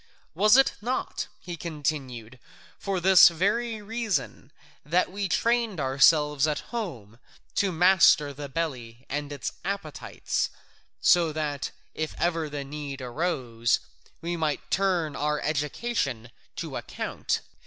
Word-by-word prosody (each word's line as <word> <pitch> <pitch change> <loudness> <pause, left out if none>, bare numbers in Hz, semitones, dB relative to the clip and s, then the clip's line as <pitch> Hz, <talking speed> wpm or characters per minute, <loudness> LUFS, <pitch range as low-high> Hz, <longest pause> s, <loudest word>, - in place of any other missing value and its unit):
Was 210 - +5
it 270 - +5
not," 250 +4 -2
he 175 -1 -7
continued, 135 -7 -4 0.4
"for 195 -2 -1
this 185 0 +8
very 210 +6 -1
reason 220 - -3 0.3
that 175 +5 +1
we 200 0 -3
trained 230 -3 +1
ourselves 150 +2 +4
at 150 -1 -1
home 125 - -5 0.4
to 200 -3 +2
master 170 -4 +5
the 140 0 -7
belly 130 -6 -4
and 145 +1 -3
its 140 -2 -4
appetites, 195 -7 -3 0.5
so 170 -2 +5
that, 150 -3 -2 0.2
if 155 0 -4
ever 165 -2 0
the 145 -1 -4
need 140 -1 -6
arose, 125 -4 0 0.4
we 170 +1 -2
might 155 -3 -2
turn 180 -6 +1
our 150 0 0
education 150 - -2 0.2
to - - -5
account? - - -3
155 Hz, 120 wpm, -27 LUFS, 140-190 Hz, 0.5 s, this